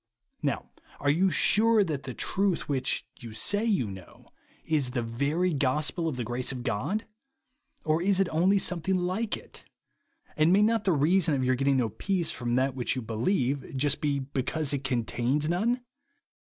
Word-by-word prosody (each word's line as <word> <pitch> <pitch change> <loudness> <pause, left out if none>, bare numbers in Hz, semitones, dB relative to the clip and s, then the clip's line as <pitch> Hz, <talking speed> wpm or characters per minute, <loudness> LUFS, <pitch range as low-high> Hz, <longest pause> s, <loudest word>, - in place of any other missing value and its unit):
Now - - -2 0.3
are 145 - +2
you 185 +6 +3
sure 215 +6 +4
that 155 -7 -3
the 130 - -6
truth 195 -2 0
which, 135 -2 -1
you 115 -3 -9
say 205 - +1
you 205 - +1
know, 95 -2 -12 0.4
is 150 -5 +1
the 125 -1 -2
very 145 +10 0
gospel 150 +4 0
of 155 - -2
the 125 - -3
grace 120 +3 -2
of 125 -2 -6
God? 145 - -2 0.8
Or 155 +1 +1
is 195 +1 +2
it 195 - +3
only* 185 +5 +3
something 180 -1 +1
hke 185 +5 -1
it? - - -11 0.7
And 155 +2 +3
may 200 +3 +5
not 225 0 +1
the 190 - +3
reason 160 +1 +3
of 130 -1 0
your 130 - +3
get 130 +2 -1
ting 140 -1 +3
no 120 -3 +1
peace 175 - -1
from 120 -1 -2
that 130 +1 +1
which 125 0 -1
you 130 - -4
beheve, 130 - -1
just 145 +2 0
be, 145 -2 +1
because 140 +2 -1
it 140 -1 -2
contains 130 +3 0
none 230 +9 0
145 Hz, 180 wpm, -28 LUFS, 130-185 Hz, 0.8 s, may